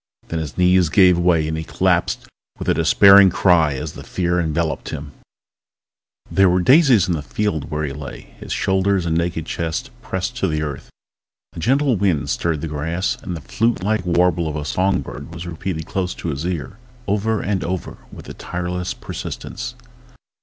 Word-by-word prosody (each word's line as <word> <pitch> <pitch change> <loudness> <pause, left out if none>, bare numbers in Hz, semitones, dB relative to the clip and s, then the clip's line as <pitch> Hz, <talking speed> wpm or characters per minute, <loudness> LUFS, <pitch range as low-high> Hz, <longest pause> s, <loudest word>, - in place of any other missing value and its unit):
Then 80 - -2
his 80 -4 -6
knees 90 -1 +4
gave 90 -1 +5
way 85 -3 +2
and 80 - -2
he 80 - -3
collapsed - - 0 0.3
with - - -6
a - - +4
despairing 100 -1 +7
cry 85 -6 +3
as 75 +3 -5
the - - -9
fear 90 -1 -1
enveloped 80 -1 -1
him... 70 0 -6 1.2
There 95 -1 +4
were 90 +1 +2
daisies 130 - +5
in 90 - +1
the 80 - -2
field 90 +1 -2
where 75 -1 -2
he 70 -2 -3
lay, 70 -4 -9
his - - -9
shoulders 95 -1 +1
and 80 -1 0
naked 85 -1 -1
chest 85 - -3
pressed 95 +4 -3
to 100 - +1
the 75 -2 -1
earth. 75 -3 -6 0.6
A - - -8
gentle 135 - +2
wind 80 -8 0
stirred 80 +3 -1
the 80 - -3
grass, 80 +5 -2
and 90 -2 -5
the - - -9
flute 115 +5 0
like 105 -1 0
warble 90 -1 +2
of 75 - -4
a 75 -1 -4
song 95 +5 +1
bird - - -9
was 85 +1 -7
repeated 85 -1 -4
close 90 +2 -2
to 85 - -5
his 75 +3 -3
ear, 90 +2 -4 0.3
over 105 +2 0
and 95 -1 -1
over 90 +1 -4
with - - -11
a - - -7
tireless 90 0 -4
persistence. - - -6
90 Hz, 185 wpm, -20 LUFS, 80-95 Hz, 1.2 s, despairing